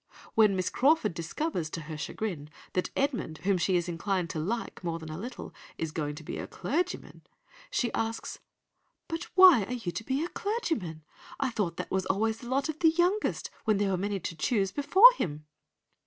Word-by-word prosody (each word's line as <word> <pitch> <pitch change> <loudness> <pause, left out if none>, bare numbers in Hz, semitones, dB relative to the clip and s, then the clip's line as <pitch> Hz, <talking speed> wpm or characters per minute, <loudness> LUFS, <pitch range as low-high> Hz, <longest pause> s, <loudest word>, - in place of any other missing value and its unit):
When 215 -3 +5
Miss 185 -1 -1
Crawford 295 - +3
discovers, 170 - -3
to 165 - -5
her 155 0 -7
chagrin, 155 -1 -4 0.2
that 180 - 0
Edmund, 265 - -1
whom 195 -1 +2
she 185 +2 +2
is 175 0 -1
inclined 175 +1 -1
to 160 - -3
like 210 +5 -3
more 165 -1 -2
than 160 -1 -8
a 155 - -5
little, 240 +4 -7 0.2
is 160 -1 -3
going 150 -2 -3
to 160 - -10
be - - -5
a - - -5
clergyman, 355 +6 -3 0.5
she 240 - -1
asks— 225 0 -3 0.7
"'But 330 -1 -4
why 365 - +8
are 250 - -5
you 225 -8 -3
to 225 - -5
be 270 +7 -1
a - - -6
clergyman? 320 - -3 0.4
I 270 -2 0
thought 185 -7 -2
that - - -5
was 190 -1 0
always 220 +3 0
the 240 - -9
lot 275 +3 +1
of 315 -1 -5
the 325 - +6
youngest, 355 +6 0
where 215 -2 +3
there 200 -1 +1
were - - +2
many 200 +1 -2
to 170 - -5
choose 195 +4 +1
before 375 - +7
him! 150 -2 -3
205 Hz, 200 wpm, -29 LUFS, 170-275 Hz, 0.7 s, why